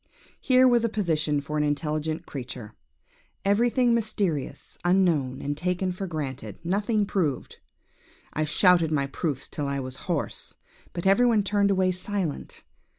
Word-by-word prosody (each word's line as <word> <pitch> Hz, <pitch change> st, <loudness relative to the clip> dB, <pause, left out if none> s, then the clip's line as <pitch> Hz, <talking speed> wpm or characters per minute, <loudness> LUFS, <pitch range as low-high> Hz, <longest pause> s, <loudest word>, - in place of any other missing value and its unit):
Here 255 Hz, -1 st, +5 dB
was 240 Hz, -2 st, +4 dB
a 230 Hz, -, +2 dB
position 160 Hz, -8 st, 0 dB
for 150 Hz, +2 st, -4 dB
an -, -, +2 dB
intelligent 155 Hz, +2 st, -1 dB
creature! 125 Hz, -5 st, -7 dB, 0.7 s
Everything 235 Hz, +4 st, +3 dB
mysterious, 205 Hz, -, -2 dB
unknown, 170 Hz, -8 st, +2 dB
and 145 Hz, +1 st, -2 dB
taken 180 Hz, +3 st, -1 dB
for 190 Hz, +2 st, -5 dB
granted; 145 Hz, -6 st, -5 dB
nothing 205 Hz, +4 st, +1 dB
proved. 170 Hz, -9 st, -2 dB, 0.7 s
I 155 Hz, -, 0 dB
shouted 170 Hz, +1 st, +4 dB
for 140 Hz, -3 st, 0 dB
proofs 140 Hz, -2 st, -3 dB
till 145 Hz, -2 st, -4 dB
I 140 Hz, 0 st, -1 dB
was 130 Hz, 0 st, -6 dB
hoarse, 170 Hz, -5 st, -2 dB, 0.4 s
but 170 Hz, -, -5 dB
every 200 Hz, +6 st, +5 dB
one 220 Hz, -4 st, +3 dB
turned 200 Hz, 0 st, +2 dB
away 190 Hz, -1 st, +3 dB
silent. 185 Hz, -3 st, -4 dB
175 Hz, 145 wpm, -26 LUFS, 145-200 Hz, 0.7 s, Here